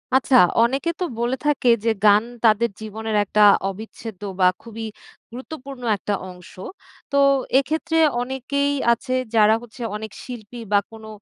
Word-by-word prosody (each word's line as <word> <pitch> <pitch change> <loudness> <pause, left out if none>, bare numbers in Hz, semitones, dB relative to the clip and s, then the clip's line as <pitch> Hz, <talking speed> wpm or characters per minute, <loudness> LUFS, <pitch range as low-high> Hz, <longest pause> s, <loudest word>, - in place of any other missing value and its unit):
আচ্ছা। 265 0 +3 0.3
অনেকে 270 +7 0
তো - - -1 0.2
বলে 240 +2 0
থাকে, 290 -4 +1 0.2
যে 230 - +2 0.2
গান 210 +1 +6 0.2
তাদের 225 +2 +4
জীবনের 220 0 -4
একটা 210 +1 0 0.3
অবিচ্ছেদ্য 215 0 -9 0.2
বা 185 - +5
খুবই 225 -1 -8 0.5
গুরুত্বপূর্ণ 265 +1 -9 0.2
একটা 205 - -3 0.2
অংশ। 180 -1 -13 0.6
তো 280 - +1 0.4
এক্ষেত্রে 320 +4 -2 0.2
অনেকেই 265 +3 -2 0.2
আছে 245 +2 -5 0.2
যারা 215 0 +5
হচ্ছে 240 +1 -13
অনেক 215 0 -6
শিল্পী 240 -2 -9
বা 205 - +5
কোনো 220 -1 -12
235 Hz, 140 wpm, -22 LUFS, 215-265 Hz, 0.6 s, গান